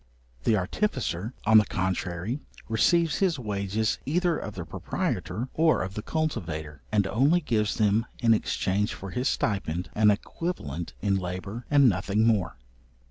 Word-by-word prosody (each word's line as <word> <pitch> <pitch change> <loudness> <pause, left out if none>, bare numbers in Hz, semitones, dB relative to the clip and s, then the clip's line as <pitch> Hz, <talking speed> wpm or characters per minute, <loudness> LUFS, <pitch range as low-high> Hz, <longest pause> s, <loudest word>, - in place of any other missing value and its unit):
The 110 - +4
artificer, 110 - -2
on 110 0 +8
the 105 - +2
contrary, 95 - -2 0.3
receives 165 +8 +3
his 185 -5 +2
wages 105 -2 -1
either 175 +3 +1
of 105 -7 -5
the 90 -3 -5
proprietor 120 +8 -3
or 160 0 +3
of 95 +1 -5
the 105 - -4
cultivator, 80 - -3
and 100 -2 +3
only 140 - +3
gives 110 -9 0
them 110 +1 +2
in 115 -2 +4
exchange 105 -1 0
for 95 -1 -8
his 125 +5 0
stipend, 90 -4 -1
an 105 0 +4
equivalent 100 - -3
in 100 -1 +2
labour, 95 +6 -5
and 145 -2 +6
nothing 105 +2 +2
more. 110 -6 +1
105 Hz, 145 wpm, -27 LUFS, 95-130 Hz, 0.3 s, on